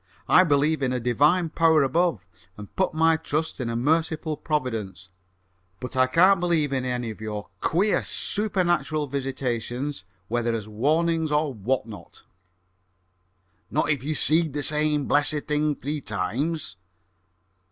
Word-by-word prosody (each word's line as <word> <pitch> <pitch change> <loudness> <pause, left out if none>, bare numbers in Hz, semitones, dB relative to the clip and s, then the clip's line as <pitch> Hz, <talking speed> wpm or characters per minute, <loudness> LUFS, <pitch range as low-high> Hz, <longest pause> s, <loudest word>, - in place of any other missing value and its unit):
"I 185 - +6
believe 150 -1 +2
in 130 -2 0
a 125 - -1
divine 150 +9 +2
power 160 -2 +3
above, 135 - 0 0.3
and 105 -1 -11
put 190 -4 0
my 160 0 +4
trust 155 0 -3
in 120 - -2
a 115 - -3
merciful 155 +4 0
providence; 115 - -3 0.7
but 125 +1 -7
I 130 0 +4
can't 185 +8 +5
believe 165 -5 +1
in 130 -1 -1
any 125 -2 -2
of 110 - -12
your 105 -1 -5
queer 195 +5 +1
supernatural 175 -7 0
visitations, 130 -2 -3 0.2
whether 120 +1 -1
as 110 -2 -5
warnings 155 +8 0
or 150 -1 +1
what 120 +3 -1
not!" 105 -7 -12 1.5
"Not 150 - +1
if 145 -5 -1
you 155 +2 -2
seed 160 -1 +2
the 145 0 -2
same 150 -1 +1
blessed 145 +1 +1
thing 150 0 +1
three 145 +3 -4
times?" 110 - -3
145 Hz, 140 wpm, -25 LUFS, 120-160 Hz, 1.5 s, I